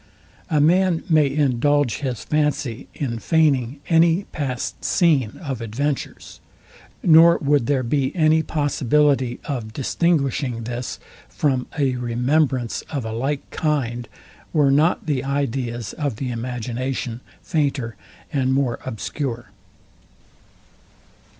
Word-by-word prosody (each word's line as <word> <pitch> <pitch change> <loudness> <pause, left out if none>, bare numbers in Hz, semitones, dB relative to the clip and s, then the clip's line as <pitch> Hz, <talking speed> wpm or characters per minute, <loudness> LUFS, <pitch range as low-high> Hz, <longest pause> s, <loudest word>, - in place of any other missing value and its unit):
A 155 -3 +2
man 175 +2 +3
may 155 -3 +5
indulge 145 -2 +2
his 125 -6 -3
fancy 145 -5 -1
in 120 -5 -3
feigning 140 -3 +1
any 165 +2 +4
past 130 -5 -4
scene 150 - +2
of 135 -6 -4
adventures; 135 +6 -4 0.6
nor 170 +1 +7
would 140 -4 +1
there 135 -3 +1
be 135 +2 0
any 160 -2 +4
possibility 145 -4 +1
of 120 -7 -4
distinguishing 140 -4 0
this 120 +1 -4 0.3
from 130 - 0
a 135 -4 +1
remembrance 125 +1 0
of 140 -6 -3
a 110 - -4
like 135 +5 -2
kind, 120 -7 -1 0.4
were 145 -3 +4
not 150 +5 +2
the 140 -4 -1
ideas 125 -5 -2
of 145 -6 -2
the 125 +2 -4
imagination 125 +1 -4 0.2
fainter 140 -7 -1 0.4
and 130 -2 +1
more 135 -4 0
obscure. 120 -1 -4
135 Hz, 110 wpm, -22 LUFS, 120-150 Hz, 0.6 s, nor